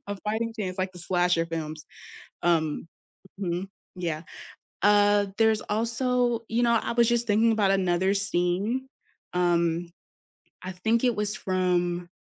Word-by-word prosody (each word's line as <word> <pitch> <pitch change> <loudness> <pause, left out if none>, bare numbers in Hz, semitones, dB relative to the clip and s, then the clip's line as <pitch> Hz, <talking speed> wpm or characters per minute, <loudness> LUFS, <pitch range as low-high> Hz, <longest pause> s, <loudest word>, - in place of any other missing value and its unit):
a 205 - -3
fighting 225 +2 -1
chance, 185 -2 -3
like 185 0 -1
the 180 - -12
slasher 175 -1 +1
films. 155 -2 -5 0.6
Um 165 -2 +1 0.5
Mhm, 180 0 -2 0.3
yeah. 165 -3 -3 0.6
Uh, 205 0 +4
there's 220 -1 +3
also 235 +2 0
you 235 +2 +1
know, 235 0 +4
I - - -3
was 235 0 +4
just 235 -1 +1
thinking 220 +2 +4
about 200 -3 +2
another 190 0 +2
scene, 200 +6 0 0.5
um, 170 -1 +1 0.7
I 185 - -5
think 220 +7 0
it 245 -2 +2
was 210 0 -2
from, 175 -2 0
195 Hz, 135 wpm, -26 LUFS, 175-220 Hz, 0.7 s, Uh